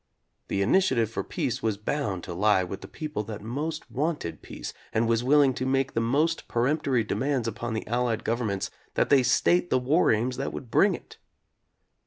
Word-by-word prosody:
The 100 - 0
initiative 120 - +2
for - - -3
peace 125 +1 -2
was 110 -3 0
bound 105 -5 -2
to 90 - -6
lie 100 +1 +3
with 95 +2 -6
the - - -9
people 150 -7 -4
that 105 -1 -7
most 150 +8 -4
wanted 145 - -2
peace - - -7 0.2
and 115 +1 +1
was 115 0 +2
willing 140 0 +5
to 130 - -3
make 135 0 +1
the 115 - +1
most 150 +8 +1
peremptory 130 0 +1
demands 120 +3 -1
upon 115 +1 -3
the 110 - -3
Allied 120 -1 0
governments 105 -5 -1 0.2
that - - +1
they 140 -2 +7
state 175 +7 +3
the - - +3
war 140 +7 +3
aims 120 +4 0
that 135 - -3
would 120 - -8
bring - - +4
it. - - -13
120 Hz, 190 wpm, -27 LUFS, 110-140 Hz, 0.2 s, they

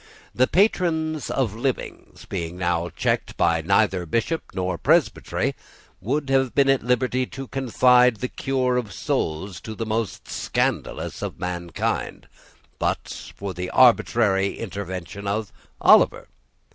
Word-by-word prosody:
The 130 +1 +3
patrons 160 -6 +1
of 125 -7 0
livings, 125 +3 -4
being 85 -2 -5
now 85 -1 0
checked - - -2
by 85 -1 +2
neither 95 0 +2
Bishop 115 - 0
nor 90 -2 -2
Presbytery, - - +1 0.5
would 140 +7 -1
have 135 -2 +2
been 140 -1 +4
at 135 -1 +3
liberty 125 +1 0
to 135 0 -8
confide 125 -1 +4
the 125 +4 -3
cure 130 -1 0
of 115 -4 -3
souls 85 +2 -2
to 110 - -7
the 115 - -4
most 110 -3 -3
scandalous - - -2
of - - -5
mankind, 85 -2 -3 0.5
but - - -3
for 100 -1 -5
the 90 +1 -4
arbitrary 110 -5 +3
intervention 100 -1 -6
of 105 +1 -2 0.3
Oliver. - - +5
110 Hz, 130 wpm, -23 LUFS, 95-130 Hz, 0.5 s, Oliver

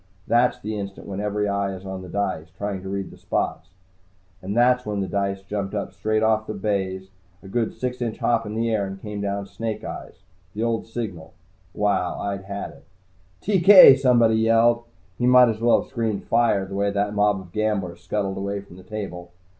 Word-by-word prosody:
That's 120 +1 +3
the 110 -2 -4
instant 100 -1 -7
when 100 -1 -5
every 105 0 -1
eye 100 -1 -1
is 95 +1 -11
on 95 -1 -5
the 90 - -10
dice, 95 -5 -2
trying 100 -2 -3
to 95 - -7
read 100 0 -4
the - - -15
spots. - - -2 0.7
And 100 +4 -4
that's 125 +1 +4
when 105 -2 -3
the 95 - -1
dice 100 -1 -2
jumped 100 0 -4 0.2
straight 110 0 0
up 110 -1 +3
off 110 - -20
the 110 - -4
baize, 95 -2 -2 0.3
a - - -11
good 115 +3 -1
six 125 0 -4
inch 115 -2 -2
hop 115 -2 +1
into 110 +2 -3
the 115 0 0
air, 100 -3 0
and 95 0 -7
came 105 0 -6
down 100 0 -2
Snake 110 +2 -5
Eyes, 95 - -8 0.3
the 110 - -2
old 115 -1 -1
signal. 95 -9 -6 0.4
Wow! 95 -4 0
I'd 100 -1 -4
had 100 +1 -5
it! - - -18 0.6
"TK!" 190 -6 +9
somebody 120 -4 +4
yelled. 115 +1 +3 0.3
He 120 - +2
might 125 -1 +7
as 110 0 -3
well 120 0 +4
have - - -20
screamed, 110 -3 -2
"Fire!" 115 -4 +2
the 95 - -9
way 100 +1 +1
that 100 +1 -1
mob 105 -1 +2
of 90 -2 -13
gamblers 100 -4 -2
scuttled 100 -2 -2
away 100 +1 -3
from 100 -2 -15
the 95 - -13
table. 90 -4 -7
105 Hz, 205 wpm, -23 LUFS, 95-115 Hz, 0.7 s, TK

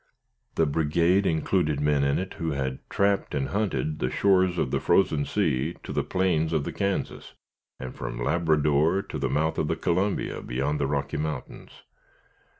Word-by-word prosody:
The 80 - +3
brigade 85 +6 +2
included 80 -2 +1
men 75 -1 +2
in 70 0 +2
it, 95 +1 -4
who 80 -2 -1
had 65 -2 -3
trapped 100 0 +1
and 70 -2 -1
hunted 80 -7 -1
the 65 - 0
shores 95 0 +2
of 65 - 0
the - - +1
Frozen 75 -7 +2
Sea 80 -5 0
to - - -6
the - - 0
plains 85 -4 0
of 80 -3 +1
the - - -5
Kansas, 100 -1 -3 0.5
and 65 -1 -6
from - - -5
Labrador 80 +3 +2
to - - -6
the 70 - -1
mouth 80 +4 0
of - - 0
the - - 0
Columbia, 95 +4 -1
beyond 70 +4 -2
the 70 - 0
Rocky 70 0 -2
Mountains. 75 +1 -6
80 Hz, 170 wpm, -26 LUFS, 70-90 Hz, 0.5 s, The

